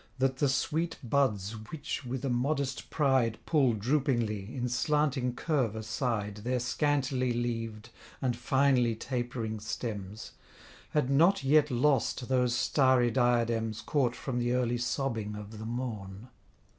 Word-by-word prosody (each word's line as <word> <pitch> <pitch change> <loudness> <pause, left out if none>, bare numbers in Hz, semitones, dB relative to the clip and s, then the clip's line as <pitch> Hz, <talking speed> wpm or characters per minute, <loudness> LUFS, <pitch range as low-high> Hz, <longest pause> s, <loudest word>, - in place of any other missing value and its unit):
That 130 0 +1
the 140 0 +2
sweet 160 +5 -1
buds 115 -6 +1 0.2
which 150 -2 -4
with 130 +2 -4
a - - 0
modest 135 0 -1
pride 130 -6 +2
Pull 135 -7 +3
droopingly, 115 -4 0
in 125 -1 -2
slanting 130 0 +1
curve 135 -9 0
aside, 110 -1 -2
Their 125 +4 -1
scantly 130 0 0
leaved, 115 -2 -3 0.3
and 125 -2 0
finely 125 -1 +2
tapering 120 -2 -3
stems, 105 -1 -5 0.6
Had 145 -3 0
not 170 +7 +4
yet 150 +2 +4
lost 130 -1 +1
those 125 -2 +2
starry 130 -2 +3
diadems 115 -3 +1
Caught 125 -1 0
from 125 -3 -3
the 120 0 0
early 120 -1 +1
sobbing 115 -4 -2
of 105 +1 -8
the 110 - -6
morn. 115 -3 -5
125 Hz, 130 wpm, -30 LUFS, 115-135 Hz, 0.6 s, not